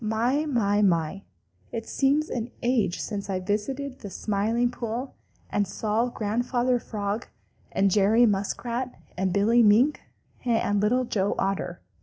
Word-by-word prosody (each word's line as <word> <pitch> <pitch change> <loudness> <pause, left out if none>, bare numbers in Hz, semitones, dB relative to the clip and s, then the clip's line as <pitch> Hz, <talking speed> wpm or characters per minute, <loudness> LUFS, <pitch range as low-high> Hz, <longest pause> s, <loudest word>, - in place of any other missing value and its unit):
My, 240 +8 +1
my, 210 -7 +2
my, 175 -1 +1 0.5
it 225 -1 -5
seems 290 +3 +1
an 235 0 -3
age 235 -7 +1
since 200 -2 -4
I 190 -1 0
visited 255 +8 -3
the 205 - -7
Smiling 220 +5 0
Pool 245 +2 -4 0.4
and 205 -1 +1
saw 215 +4 0
Grandfather 245 +3 0
Frog 210 0 -3 0.4
and 195 0 +2
Jerry 215 +5 +5
Muskrat 235 +5 -1 0.2
and 190 0 0
Billy 215 +5 +4
Mink 230 +7 +4 0.4
and 225 -4 +1
Little 250 +5 +2
Joe 200 -3 0
Otter! 195 -2 -2
220 Hz, 135 wpm, -26 LUFS, 200-245 Hz, 0.5 s, Jerry